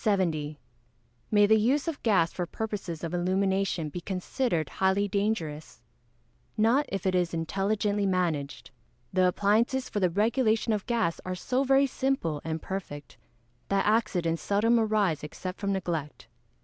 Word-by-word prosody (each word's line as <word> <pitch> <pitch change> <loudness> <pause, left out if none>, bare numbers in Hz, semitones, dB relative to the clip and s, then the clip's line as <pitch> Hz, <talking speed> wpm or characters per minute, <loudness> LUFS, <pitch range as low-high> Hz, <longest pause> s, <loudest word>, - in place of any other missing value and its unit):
May 205 -1 +5
the 220 +1 +5
use 270 +8 +1
of 325 -3 -3
gas 185 -7 +2
for 175 -1 -3
purposes 195 -6 -5
of 165 - -4
illumination 190 -2 0
be 175 +4 -6
considered 185 - -1
highly 190 +2 +3
dangerous? 160 - -3 0.7
Not 235 +7 +3
if 195 -1 -4
it 190 - +2
is 180 -2 +1
intelligently 200 +4 0
managed. 165 -7 -1 0.4
The 185 -1 +4
appliances 225 +8 +1
for 205 - -2
the 185 -2 +3
regulation 220 +3 +1
of 210 -1 -3
gas 230 -8 0
are 185 0 -3
so 255 +8 0
very 270 +1 +4
simple 260 - -1
and 160 0 -3
perfect, 150 -7 -7 0.5
that 195 0 +1
accidents 185 -7 +1
seldom 225 +4 +2
arise 210 -9 +1
except 180 +5 -6
from 200 -1 -1
neglect. 170 -6 -3
195 Hz, 140 wpm, -28 LUFS, 170-220 Hz, 0.7 s, May